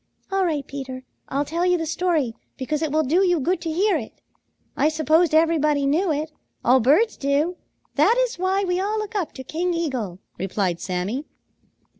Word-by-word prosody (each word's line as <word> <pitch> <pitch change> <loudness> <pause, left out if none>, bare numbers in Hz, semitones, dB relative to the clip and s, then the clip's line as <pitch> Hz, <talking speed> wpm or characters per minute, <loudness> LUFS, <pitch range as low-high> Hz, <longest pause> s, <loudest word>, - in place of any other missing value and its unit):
"All 390 0 +2
right, 305 -6 -1
Peter. 260 -2 -7 0.3
I'll 280 +2 0
tell 335 +4 -2
you 360 0 +3
the 325 - -2
story, 320 -6 0 0.2
because 290 +3 -2
it 315 -3 -1
will 310 +1 +2
do 335 +8 +3
you 355 -3 +3
good 340 +5 0
to 330 -2 -3
hear 390 +6 +2
it. - - -8 0.6
I 300 - +3
supposed 315 +1 +2
everybody 305 -3 +3
knew 320 +6 +2
it. 305 +1 -2 0.3
All 255 +2 +6
birds 305 - +3
do. 290 +6 0 0.4
That 465 - +5
is - - 0
why 380 +2 +1
we 360 -1 0
all 415 +3 -1
look 430 +1 -4
up 390 -6 -2
to 260 - -8
King 340 +6 -2
Eagle," 255 - -2 0.2
replied 185 -2 -1
Sammy. 195 - -3
315 Hz, 185 wpm, -23 LUFS, 275-360 Hz, 0.6 s, All